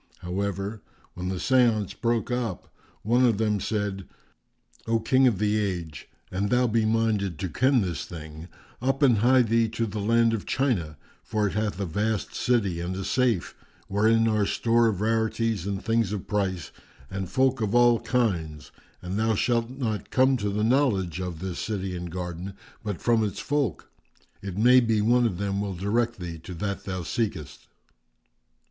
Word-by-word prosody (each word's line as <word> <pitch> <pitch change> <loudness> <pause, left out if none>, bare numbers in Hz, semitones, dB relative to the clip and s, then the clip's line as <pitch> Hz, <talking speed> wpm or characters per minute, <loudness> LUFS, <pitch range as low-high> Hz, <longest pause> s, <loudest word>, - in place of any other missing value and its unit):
However, 100 +3 -3 0.3
when 90 +1 -4
the 95 - -2
séance 115 -1 +2
broke 115 -1 -1
up, 120 -7 -3 0.3
one 120 +4 +3
of 115 -5 +3
them 105 -1 +1
said, 100 -1 -3 0.8
"O 115 0 +2
King 130 +4 +3
of 115 -6 +2
the 105 +2 +1
Age, 85 -7 -4 0.2
an 95 +2 -1
thou 125 +2 +3
be 115 -1 +1
minded 110 -5 0
to 95 - -3
ken 130 - +3
this 85 -8 -3
thing, 80 -1 -9 0.3
up 135 +3 0
and 120 -6 +5
hie 125 +3 +5
thee 115 0 +2
to 115 +1 -2
the 105 0 -5
land 115 +2 +3
of 110 - -4
China; 95 - 0 0.3
for 105 -1 -1
it 100 - -1
hath 105 -2 -2
a 100 - -1
vast 105 +4 -1
city[FN#392] 100 -9 0
and 90 +1 -3
a 95 - -4
safe, 120 -7 0 0.3
wherein 110 +3 +3
are 105 -2 +2
store 115 0 +2
of 100 -4 -1
rarities 110 -2 0
and 100 -1 -3
things 115 -3 +1
of 105 -3 -4
price 95 -6 -2 0.4
and 95 -2 -4
folk 130 +1 +1
of 105 +1 0
all 120 -1 +5
kinds; 95 - -1 0.3
and 90 +3 -3
thou 110 0 +2
shalt 115 +2 +1
not 120 -5 -3
come 130 +1 +3
to 105 -3 -2
the 105 +1 -1
knowledge 110 - +1
of 90 -3 -4
this 90 +1 -5
city 95 -4 -3
and 90 0 -5
garden 90 +2 -5 0.3
but 105 -6 -4
from 115 -2 +3
its 105 -2 -3
folk; 145 -4 -2 0.5
it 95 -2 -6
may 125 +4 +6
be 115 -3 +1
one 120 +3 +3
of 95 -6 -4
them 100 0 -1
will 100 -2 -3
direct 115 +6 0
thee 85 -2 -6
to 90 +3 -9
that 100 +3 -4
thou 95 -2 -4
seekest." 80 - -4
105 Hz, 180 wpm, -26 LUFS, 95-115 Hz, 0.8 s, may